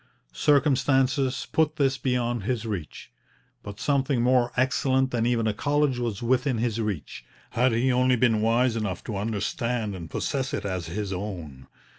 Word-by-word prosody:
Circumstances 135 - +2
put 155 -1 +2
this 135 -2 +1
beyond 120 -2 0
his 115 +2 -2
reach; 100 -9 -6 0.5
but 105 0 -9
something 135 -3 +1
more 125 -1 +3
excellent 130 0 +2
than 120 -1 0
even 120 -2 +1
a 110 - +1
college 145 +2 +1
was 115 -3 -3
within 125 +1 +1
his 115 -1 -1
reach, 100 - -4 0.3
had 125 +2 +2
he 120 +3 +2
only 125 0 +3
been 115 -3 +2
wise 115 +2 +2
enough 105 -5 -3
to 110 - -5
understand 115 - -2
and 85 -3 -7
possess 140 +1 -2
it - - -5
as 90 -4 -3
his 100 +3 -3
own. 85 -9 -6
120 Hz, 160 wpm, -26 LUFS, 105-130 Hz, 0.5 s, more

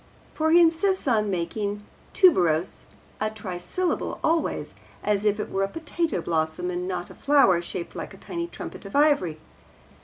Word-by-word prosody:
For 315 0 +1
he 340 +2 +7
insists 340 +2 +3
on 215 -4 +2
making 200 +3 -2 0.3
'tuberose' 180 - +3 0.3
a 215 - 0
trisyllable 205 - -3
always, 325 +1 0 0.3
as 210 0 +1
if 210 0 +2
it - - -4
were 195 - 0
a 195 - +2
potato 325 - -2
blossom 160 +2 -1
and 180 0 -3
not 180 -1 -4
a - - -10
flower 275 -12 +4
shaped 170 0 -6
like - - -6
a - - -15
tiny 340 -1 -5
trumpet - - -8
of - - -9
ivory. 285 - +3
210 Hz, 160 wpm, -25 LUFS, -, 0.3 s, he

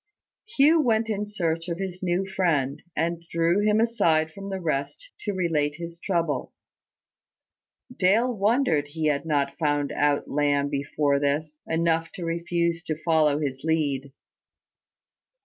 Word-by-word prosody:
Hugh 315 -3 +4
went 225 -4 +1
in 210 0 -2
search 170 -4 -2
of 170 - -2
his 185 -1 -5
new 180 +1 0
friend, 165 -8 0
and 170 +2 -1
drew 170 +3 +2
him 210 +1 +3
aside 170 -9 +2
from 195 +4 -9
the 195 -1 -3
rest 160 - -3
to 205 - -3
relate 160 -6 0
his 170 +1 -8
trouble. 165 -9 -1 1.4
Dale 230 +7 +3
wondered 205 - +2
he 155 +2 -4
had 140 +1 -1
not 140 -2 0
found 145 -2 0
out 145 -1 +1
Lamb 145 0 +1
before 140 0 0
this, 150 +2 -1
enough 165 0 +1
to 175 - -6
refuse 170 0 -1
to 155 - -2
follow 155 -3 +3
his 135 -2 -3
lead. 145 -4 0
165 Hz, 140 wpm, -25 LUFS, 145-190 Hz, 1.4 s, Hugh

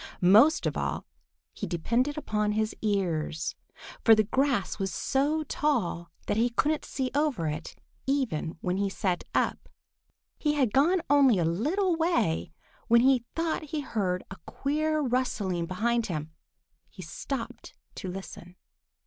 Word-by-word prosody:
Most 215 - +6
of - - 0
all - - -2 0.5
he - - -5
depended 235 - 0
upon 210 -7 0
his 215 0 -1
ears, 175 -7 -1 0.5
for 225 - +8
the 215 - +3
grass 260 -2 0
was 195 -1 -1
so 290 +3 0
tall 230 - -1 0.2
that 205 - -1
he 235 +2 +3
couldn't 295 +6 0
see 260 -2 -3
over 285 - 0
it, 150 0 -4 0.3
even 250 - -1
when 180 +1 -1
he 200 0 0
sat 185 -2 -1
up. - - 0 0.7
He 300 -1 +1
had 260 -7 +1
gone 330 +6 +3
only 275 -6 +5
a 170 - +1
little 320 - +1
way 85 - 0 0.4
when 235 0 +6
he 255 -2 +3
thought 330 -1 -1
he 300 0 -3
heard 190 -9 -1
a 195 - -7
queer 310 +2 0
rustling 215 - -1
behind 230 +5 0
him. 155 -4 -4 0.6
He 185 - -10
stopped 230 - -6 0.2
to - - -7
listen. 180 -1 -8
230 Hz, 145 wpm, -28 LUFS, 185-285 Hz, 0.7 s, for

